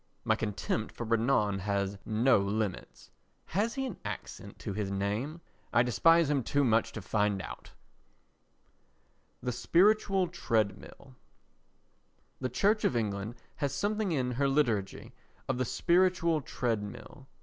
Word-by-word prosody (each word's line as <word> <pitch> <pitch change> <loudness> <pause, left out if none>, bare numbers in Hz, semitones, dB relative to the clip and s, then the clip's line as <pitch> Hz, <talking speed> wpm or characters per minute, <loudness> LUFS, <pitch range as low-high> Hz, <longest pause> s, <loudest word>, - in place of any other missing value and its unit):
My - - +2
contempt 110 0 -2
for - - -4
Renan 110 -3 +2
has 100 0 -2
no 115 +2 +4
limits. 100 - -3 0.3
(Has 215 +6 -1
he 270 -1 -1
an 245 -8 -5
accent - - -7
to - - -5
his 100 -1 -2
name? 105 +12 -2 0.3
I 120 +1 +4
despise 165 +7 +4
him 145 -2 +1
too 140 +4 +1
much 115 -3 +2
to 105 - -6
find 105 0 +1
out.) - - -8 1.7
The 125 - -1
Spiritual 190 - +3
Treadmill 115 - -2 1.3
The 130 - -2
Church 205 - +2
of - - +2
England 105 0 -2 0.2
has 140 -1 -1
something 205 +4 0
in 130 -5 0
her 140 +3 +1
liturgy 120 -9 0 0.3
of 130 -2 -1
the 130 - +1
spiritual 170 +1 +2
treadmill. 120 +2 -4
125 Hz, 130 wpm, -30 LUFS, 105-165 Hz, 1.7 s, no